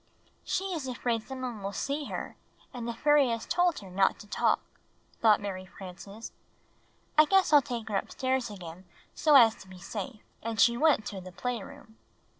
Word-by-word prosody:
"She -, -, -1 dB
is 305 Hz, -6 st, -4 dB
afraid 240 Hz, -2 st, -1 dB
some 260 Hz, +3 st, -8 dB
one 240 Hz, -5 st, -4 dB
will 195 Hz, +1 st, -3 dB
see 285 Hz, +7 st, -2 dB
her, -, -, -5 dB, 0.4 s
and 240 Hz, -2 st, -5 dB
the 235 Hz, -, -2 dB
fairy 295 Hz, 0 st, +4 dB
has 230 Hz, -1 st, -2 dB
told 350 Hz, -1 st, +2 dB
her 195 Hz, -, -11 dB
not 195 Hz, +1 st, +2 dB
to 210 Hz, -, -13 dB
talk," -, -, +2 dB, 0.6 s
thought 215 Hz, -2 st, +6 dB
IMary 185 Hz, -2 st, -6 dB
Frances. 195 Hz, +4 st, -10 dB, 0.9 s
"I 310 Hz, -, +9 dB
guess 385 Hz, -1 st, +3 dB
I'll 295 Hz, -, +9 dB
take 235 Hz, -3 st, -5 dB
her 205 Hz, -2 st, 0 dB
upstairs 260 Hz, +1 st, -1 dB
again 180 Hz, -2 st, -9 dB, 0.3 s
so 300 Hz, -2 st, +4 dB
as 230 Hz, -4 st, +8 dB
to 190 Hz, -, -14 dB
be 185 Hz, 0 st, -12 dB
safe." 215 Hz, +5 st, -6 dB, 0.2 s
And 225 Hz, -1 st, -4 dB
she 235 Hz, +4 st, +6 dB
went 295 Hz, -4 st, +3 dB
to 195 Hz, -2 st, -5 dB
the 185 Hz, 0 st, -10 dB
playroom. 220 Hz, +3 st, -6 dB
230 Hz, 185 wpm, -29 LUFS, 195-265 Hz, 0.9 s, I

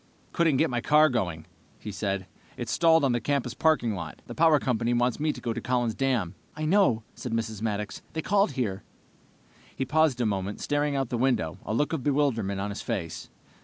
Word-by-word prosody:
"Couldn't 165 Hz, -5 st, +3 dB
get 160 Hz, 0 st, +2 dB
my 120 Hz, -1 st, -1 dB
car 150 Hz, +4 st, +5 dB
going," 90 Hz, -, -2 dB, 0.3 s
he 105 Hz, -, -7 dB
said. 100 Hz, -1 st, -2 dB, 0.3 s
"It's -, -, -4 dB
stalled 165 Hz, -2 st, +4 dB
on 135 Hz, -, +3 dB
the 120 Hz, -1 st, 0 dB
campus 135 Hz, -1 st, -1 dB
parking 150 Hz, -7 st, +2 dB
lot. 95 Hz, -, -6 dB
The -, -, -8 dB
power 160 Hz, -1 st, +5 dB
company 120 Hz, -2 st, 0 dB
wants 120 Hz, +1 st, +1 dB
me 155 Hz, +1 st, +1 dB
to -, -, -8 dB
go 115 Hz, -, -2 dB
to 115 Hz, -, -5 dB
Collin's 120 Hz, -2 st, 0 dB
Dam." 120 Hz, -10 st, 0 dB, 0.2 s
"I 155 Hz, 0 st, -3 dB
know," 155 Hz, -, +3 dB
said 125 Hz, -, -6 dB
Mrs. 110 Hz, -2 st, -2 dB
Maddox. 105 Hz, -2 st, -3 dB
"They 160 Hz, -, -3 dB
called 205 Hz, 0 st, +2 dB
here." 100 Hz, -7 st, -2 dB, 0.9 s
He 135 Hz, -, -2 dB
paused 150 Hz, -2 st, +2 dB
a 120 Hz, -, +1 dB
moment, 100 Hz, -1 st, -2 dB
staring 145 Hz, 0 st, 0 dB
out 135 Hz, -3 st, -1 dB
the 120 Hz, -, -2 dB
window, 120 Hz, -11 st, 0 dB
a -, -, -1 dB
look 145 Hz, +5 st, +1 dB
of 160 Hz, -, -1 dB
bewilderment 125 Hz, -9 st, +1 dB
on 100 Hz, +1 st, -2 dB
his 100 Hz, -, -5 dB
face. 95 Hz, -9 st, -4 dB
125 Hz, 205 wpm, -27 LUFS, 110-150 Hz, 0.9 s, car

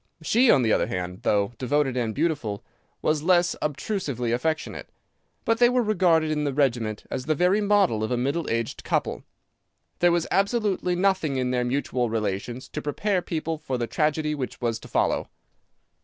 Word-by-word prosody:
She, 240 Hz, +9 st, +4 dB
on 130 Hz, -, +5 dB
the 110 Hz, -, +3 dB
other -, -, +2 dB
hand, 90 Hz, 0 st, -4 dB
though 100 Hz, +2 st, +1 dB
devoted 135 Hz, 0 st, +1 dB
and 115 Hz, -3 st, -1 dB
faithful, 145 Hz, -10 st, -1 dB, 0.4 s
was 155 Hz, -1 st, +1 dB
less 175 Hz, +1 st, +3 dB
obtrusively 145 Hz, -, -2 dB
affectionate. 155 Hz, +7 st, -2 dB, 0.6 s
But 230 Hz, 0 st, +2 dB
they 240 Hz, 0 st, +6 dB
were 250 Hz, 0 st, +2 dB
regarded 175 Hz, -7 st, +2 dB
in 150 Hz, -1 st, 0 dB
the 140 Hz, -2 st, -1 dB
regiment 120 Hz, -7 st, 0 dB
as 130 Hz, -1 st, -3 dB
the 155 Hz, +1 st, +1 dB
very 180 Hz, +6 st, +3 dB
model 200 Hz, -, +2 dB
of 110 Hz, -, -1 dB
a 125 Hz, -, 0 dB
middle 140 Hz, +6 st, -1 dB
aged 115 Hz, 0 st, -2 dB
couple. -, -, -1 dB, 0.8 s
There 175 Hz, 0 st, +4 dB
was 170 Hz, -1 st, +1 dB
absolutely 200 Hz, -3 st, +1 dB
nothing 180 Hz, -6 st, +1 dB
in 130 Hz, -1 st, 0 dB
their 125 Hz, -1 st, +1 dB
mutual 125 Hz, -1 st, -1 dB
relations 110 Hz, +3 st, -3 dB
to 150 Hz, -, -5 dB
prepare 185 Hz, +6 st, -1 dB
people 160 Hz, -1 st, -3 dB
for 135 Hz, -4 st, -3 dB
the 120 Hz, -, -1 dB
tragedy 150 Hz, +5 st, 0 dB
which 135 Hz, -4 st, -5 dB
was 115 Hz, -2 st, -1 dB
to -, -, -12 dB
follow. -, -, 0 dB
150 Hz, 175 wpm, -25 LUFS, 120-175 Hz, 0.8 s, they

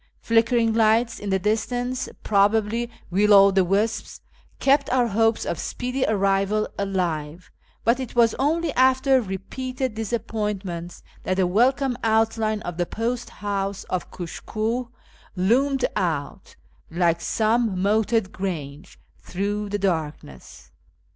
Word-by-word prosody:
Flickering 230 Hz, 0 st, +2 dB
lights 225 Hz, +1 st, +2 dB
in 205 Hz, -, -5 dB
the 190 Hz, -, +2 dB
distance, 245 Hz, +5 st, -1 dB
probably 215 Hz, +3 st, +2 dB, 0.2 s
will 205 Hz, +3 st, +5 dB
o' 195 Hz, 0 st, +7 dB
the 190 Hz, -1 st, +3 dB
wisps, 210 Hz, +4 st, -1 dB, 0.4 s
kept 280 Hz, +1 st, +3 dB
our 250 Hz, -1 st, +3 dB
hopes 225 Hz, +2 st, +1 dB
of 170 Hz, -, -3 dB
speedy 250 Hz, +1 st, -3 dB
arrival 200 Hz, 0 st, +1 dB
alive; 175 Hz, -5 st, -3 dB, 0.3 s
but 235 Hz, +3 st, +2 dB
it 255 Hz, -2 st, -6 dB
was 230 Hz, -2 st, +4 dB
only 315 Hz, +2 st, +1 dB
after 260 Hz, +1 st, +4 dB
repeated 250 Hz, +6 st, -4 dB
disappointments 210 Hz, -6 st, -4 dB, 0.2 s
that 185 Hz, -, -2 dB
the 190 Hz, -, +3 dB
welcome 250 Hz, +7 st, +2 dB
outline 220 Hz, -1 st, +1 dB
of 175 Hz, -1 st, -5 dB
tlie 175 Hz, -1 st, -1 dB
post 235 Hz, +2 st, -3 dB
house 200 Hz, -1 st, -3 dB
of 185 Hz, -, -2 dB
Kushkiih 220 Hz, +7 st, -4 dB, 0.5 s
loomed 255 Hz, +8 st, +2 dB
out, 160 Hz, -6 st, -3 dB, 0.3 s
like 170 Hz, 0 st, +1 dB
some 220 Hz, -3 st, +1 dB
" -, -, -1 dB
moated 215 Hz, 0 st, +1 dB
grange," 165 Hz, -3 st, -6 dB, 0.2 s
through 205 Hz, +2 st, -3 dB
the 205 Hz, -, -1 dB
darkness. 160 Hz, -, -4 dB
215 Hz, 125 wpm, -23 LUFS, 190-235 Hz, 0.5 s, o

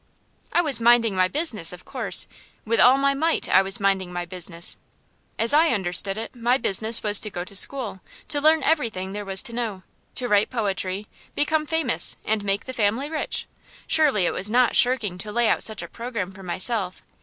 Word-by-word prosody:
I 345 Hz, -, +3 dB
was 275 Hz, -7 st, +1 dB
minding 230 Hz, -2 st, +4 dB
my 185 Hz, 0 st, +3 dB
business, 225 Hz, -, +2 dB
of 180 Hz, 0 st, -12 dB
course; -, -, +1 dB, 0.4 s
with 230 Hz, +1 st, 0 dB
all 255 Hz, +2 st, +6 dB
my 275 Hz, 0 st, +2 dB
might 320 Hz, +4 st, -1 dB
I -, -, +5 dB
was 195 Hz, 0 st, -2 dB
minding 195 Hz, -2 st, 0 dB
my 175 Hz, 0 st, -4 dB
business. 175 Hz, -1 st, -5 dB, 0.6 s
As 230 Hz, +4 st, +1 dB
I 315 Hz, +3 st, +5 dB
understood 195 Hz, -1 st, +1 dB
it, 225 Hz, +3 st, -6 dB
my 240 Hz, +2 st, +1 dB
business 220 Hz, 0 st, +1 dB
was 210 Hz, -1 st, +4 dB
to 215 Hz, -, -3 dB
go 175 Hz, -3 st, -5 dB
to 185 Hz, -, -10 dB
school, 215 Hz, -3 st, +2 dB, 0.3 s
to 290 Hz, -, 0 dB
learn 310 Hz, +1 st, +3 dB
everything 220 Hz, -, -1 dB
there 205 Hz, 0 st, -6 dB
was 195 Hz, -1 st, +1 dB
to 235 Hz, -, -7 dB
know, 220 Hz, -6 st, -4 dB, 0.3 s
to 250 Hz, -, -3 dB
write 205 Hz, -2 st, +2 dB
poetry, 200 Hz, -4 st, -2 dB, 0.3 s
become 305 Hz, +1 st, 0 dB
famous, 320 Hz, -7 st, +1 dB
and 215 Hz, -1 st, -1 dB
make 200 Hz, 0 st, -2 dB
the 260 Hz, -, -7 dB
family 235 Hz, +6 st, -1 dB
rich. 315 Hz, -, -2 dB, 0.4 s
Surely 280 Hz, -, +2 dB
it -, -, 0 dB
was 195 Hz, +3 st, -2 dB
not 245 Hz, +2 st, +2 dB
shirking 225 Hz, -8 st, +2 dB
to 210 Hz, +2 st, -7 dB
lay 235 Hz, +1 st, +1 dB
out -, -, +1 dB
such 220 Hz, -, -1 dB
a -, -, -7 dB
programme 230 Hz, -6 st, -6 dB
for 195 Hz, 0 st, -14 dB
myself. 185 Hz, +1 st, -2 dB
220 Hz, 200 wpm, -23 LUFS, 190-255 Hz, 0.6 s, all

